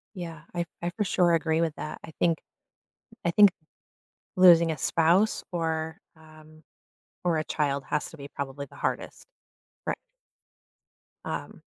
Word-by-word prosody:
Yeah. 165 -4 -7
I 175 0 0 0.2
I 175 - -1
for 210 - +1
sure 180 -2 +3
agree 160 -1 +1
with 165 -2 0
that. 155 - -6
I - - -8
think 165 -2 +3 0.9
I 170 - +3
think 205 +2 +7 0.8
losing 170 -3 +7
a 155 - -3
spouse 170 - +3
or, 160 -2 -2 0.2
um, 155 0 -17 0.6
or 175 -2 +2
a 155 - 0
child 140 -3 -1
has 150 - -1
to 160 - -12
be 140 -1 -8
probably 140 0 -5
the - - -16
hardest. - - -3 0.6
Ri - - +1 1.3
Um - - -5
160 Hz, 145 wpm, -27 LUFS, 155-175 Hz, 1.3 s, think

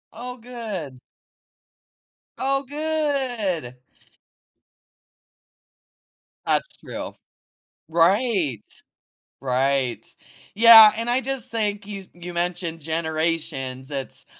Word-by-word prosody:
Oh 250 +2 -7
good. 215 - -7 1.4
Oh 275 +1 0
good. 270 - -2 2.7
That's - - 0
true. - - -7 0.7
Right, 170 - +2 0.8
right. 130 -1 0 0.5
Yeah, 225 -1 +10
and 230 +1 -2
I 250 +2 +2
just 270 0 -4
think 210 -3 -2
you 200 -2 -7
you 175 0 -9
mentioned 170 -1 -2
generations, 160 -4 -2
it's 135 -2 -6
190 Hz, 75 wpm, -23 LUFS, 155-240 Hz, 2.7 s, Yeah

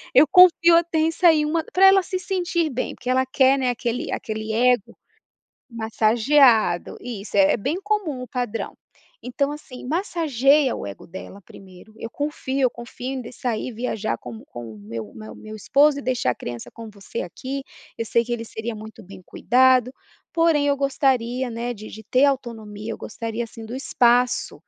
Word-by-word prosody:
"Eu 275 - +8
confio 350 -2 +7
até 335 -1 0
em 320 +1 +2
sair 325 -3 +4
uma", 320 +1 0
pra 385 +1 +5
ela 385 0 +6
se 370 - -3
sentir 350 -3 -1
bem. 255 - -3
Porque 250 - -7
ela 260 +1 +2
quer, 265 +1 +3
né, 255 - +1
aquele 240 0 -3
aquele 220 0 -4
ego 245 -2 +1 0.7
massageado. 225 -2 +3
Isso, 215 -5 -6
é 195 -1 +5
é - - +1
bem 280 - -2
comum, 395 -11 -2
o 250 - -8
padrão. 245 -3 -4 0.5
Então 280 +3 -1
assim, 255 -4 -10
massageia 295 - +2
o - - -6
ego 100 -1 -9
dela 190 +3 -10
primeiro, 190 +3 -15
"eu 230 - -6
confio 285 -2 -3
eu 255 -2 +3
confio 245 +2 -7
em 260 - -4
de 235 - -10
sair 245 0 -3
viajar 220 - -3
como 115 -3 -10
com 115 -2 -9
o - - -13
meu 110 +1 -7
o - - -19
meu 110 0 -10
o - - -13
meu 215 0 -9
esposo 285 +6 +3
e - - -6
deixar 250 - 0
a - - -9
criança 120 -1 -6
com 230 -2 -9
você 200 +3 -6
aqui, 270 +8 -6 0.4
eu 230 - -2
sei 235 - +2
que 240 - -5
ele 230 -1 -3
seria 225 +1 -6
muito 220 +1 -11
bem 190 -2 -11
cuidado, 255 +3 +3 0.5
porém 330 -3 +3
eu 285 0 +2
gostaria, 260 -2 0
né, 230 +1 -4
de 215 0 -10
de 220 - -11
ter 255 +5 +3
autonomia, 225 -4 -7
eu - - -7
gostaria, 230 +1 -4
assim, 225 0 -11
do 245 +3 -6
espaço, 245 0 +2
245 Hz, 190 wpm, -23 LUFS, 220-280 Hz, 0.7 s, Eu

